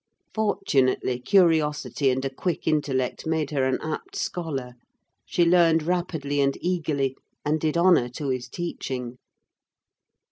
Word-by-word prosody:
Fortunately, 135 Hz, -, +1 dB
curiosity 150 Hz, -2 st, +2 dB
and 130 Hz, +1 st, 0 dB
a 135 Hz, -, -2 dB
quick 175 Hz, +4 st, -3 dB
intellect 145 Hz, -4 st, 0 dB
made 160 Hz, -2 st, 0 dB
her 135 Hz, -3 st, +1 dB
an 130 Hz, -1 st, +1 dB
apt 345 Hz, -, -5 dB
scholar: 145 Hz, -, -3 dB, 0.5 s
she 175 Hz, -, +2 dB
learned 170 Hz, -2 st, +4 dB
rapidly 160 Hz, -5 st, -1 dB
and 140 Hz, 0 st, +1 dB
eagerly, 150 Hz, -7 st, -1 dB, 0.3 s
and 155 Hz, +2 st, +1 dB
did 155 Hz, +1 st, 0 dB
honour 170 Hz, -8 st, +4 dB
to 140 Hz, +3 st, -5 dB
his 125 Hz, -1 st, -3 dB
teaching. 125 Hz, -7 st, -5 dB
150 Hz, 130 wpm, -25 LUFS, 130-170 Hz, 0.5 s, learned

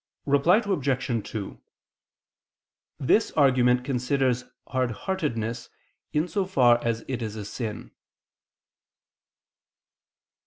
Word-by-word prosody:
Reply 150 Hz, +10 st, +4 dB
Obj. 135 Hz, -, -1 dB
2: 105 Hz, -3 st, -6 dB, 1.4 s
This 180 Hz, -, +3 dB
argument 125 Hz, -3 st, +3 dB
considers 125 Hz, -1 st, 0 dB, 0.2 s
hardheartedness 120 Hz, -, -2 dB, 0.4 s
in 150 Hz, +3 st, +1 dB
so 190 Hz, +2 st, -1 dB
far 120 Hz, -9 st, +4 dB
as 115 Hz, -1 st, -1 dB
it 130 Hz, -2 st, -3 dB
is 110 Hz, -2 st, -4 dB
a 105 Hz, -2 st, -6 dB
sin. 105 Hz, +1 st, -6 dB
125 Hz, 85 wpm, -26 LUFS, 115-145 Hz, 1.4 s, Reply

